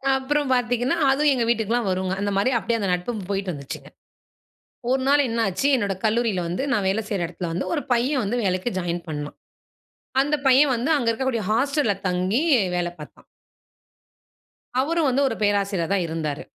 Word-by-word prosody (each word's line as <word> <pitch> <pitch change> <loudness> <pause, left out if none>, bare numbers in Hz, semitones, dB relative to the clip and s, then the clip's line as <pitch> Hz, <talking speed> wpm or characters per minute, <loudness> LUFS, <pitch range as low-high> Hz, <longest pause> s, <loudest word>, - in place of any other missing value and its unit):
அப்பறம் 275 +1 0
பார்த்தீங்கன்னா, 245 +4 +1
அதுவும் 290 +1 +3
எங்க 240 - 0
வீட்டுக்கெல்லாம் 230 -1 +1
வருங்க. 185 0 -1
அந்த 205 0 -1
மாரி 205 +6 +2
அப்படியே 230 0 -1
அந்த 200 -3 -1
நட்பும் 200 +4 -3
போயிட்டுருந்துச்சுங்க. 180 -9 -4 1.0
ஒரு 260 0 +2
நாள் 285 0 +4
என்னாச்சு? 225 +2 0
என்னோட 205 -6 0
கல்லூரியில 220 -4 +1
வந்து 175 +9 -2
நான் 210 -7 +1
வேல 205 +3 0
செய்ற 200 -5 -1
இடத்துல 175 0 -5
வந்து, 175 - -2
ஒரு 290 - -1
பையன் 255 +3 +1
வந்து 220 +5 -1
வேலைக்கு 185 +5 0
ஜாயின் 175 -1 -3
பண்ணான். 150 -1 -5 0.9
அந்த 290 +2 0
பையன் 265 +1 +5
வந்து 245 +7 -1
அங்க 245 -5 0
இருக்கக்கூடிய 235 -1 -1
ஹாஸ்டல்‌ல 275 -1 +1
தங்கி 185 +6 0 0.4
வேல 175 -1 -1
பார்த்தான். 150 - -12 1.6
அவரும் 325 +1 +1
வந்து 265 +2 +2
ஒரு 225 - -3
பேராசிரியர் 200 -4 0
தான் 185 -3 +1
இருந்தாரு. 160 -1 -3
225 Hz, 160 wpm, -23 LUFS, 185-260 Hz, 1.6 s, பையன்